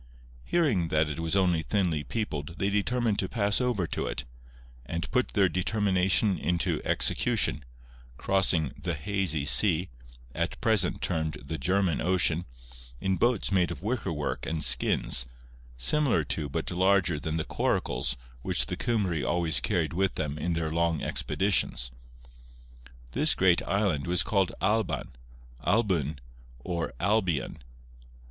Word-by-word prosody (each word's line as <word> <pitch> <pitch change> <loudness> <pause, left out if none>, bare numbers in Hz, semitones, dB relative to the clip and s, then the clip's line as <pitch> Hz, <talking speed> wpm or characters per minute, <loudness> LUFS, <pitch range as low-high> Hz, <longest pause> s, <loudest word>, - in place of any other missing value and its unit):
Hearing 120 - +1
that 75 -1 +1
it 75 - -5
was 80 +3 -1
only 90 -4 +2
thinly 80 +1 -1
peopled 85 -9 -4
they 100 +1 0
determined 110 +1 0
to 95 - -1
pass 105 0 +1
over 120 -8 0
to - - -3
it; 65 - -4 0.6
and 85 +6 -5
put 125 -1 +1
their 100 -3 +4
determination 95 0 +1
into 85 +2 -1
execution, - - +1 0.5
crossing 95 -6 +2
'the 85 -2 -2
hazy 85 -2 -1
sea,' 90 +2 +5 0.4
at 85 +1 -3
present 110 -4 +2
termed 80 -3 -1
the 80 +1 -5
German 90 +4 +1
Ocean, 85 -1 +1 0.5
in 95 +4 0
boats 120 -5 +1
made 90 -3 +2
of 85 0 -7
wicker 110 -4 -2
work 75 -2 -3
and 80 -1 -1
skins, - - +4 0.5
similar 120 - +3
to 75 0 -3
but 80 +5 -3
larger 90 -3 +2
than 80 +2 -3
the 80 - -1
coracles - - -1 0.2
which - - +1
the - - -4
Cymry 100 - -1
always 85 -2 +1
carried 85 -6 -1
with 95 +2 0
them 75 -1 -3
in 85 +3 -1
their 80 -1 -2
long 85 -1 0
expeditions. 95 -11 0 1.2
This - - +4
great 90 -2 +3
island 100 -8 0
was 90 0 +2
called 95 -4 +1
Alban, 110 +2 0 0.5
Albyn, 90 - +1 0.5
or 85 -7 -3
Albion. 90 - 0
90 Hz, 140 wpm, -28 LUFS, 80-100 Hz, 1.2 s, sea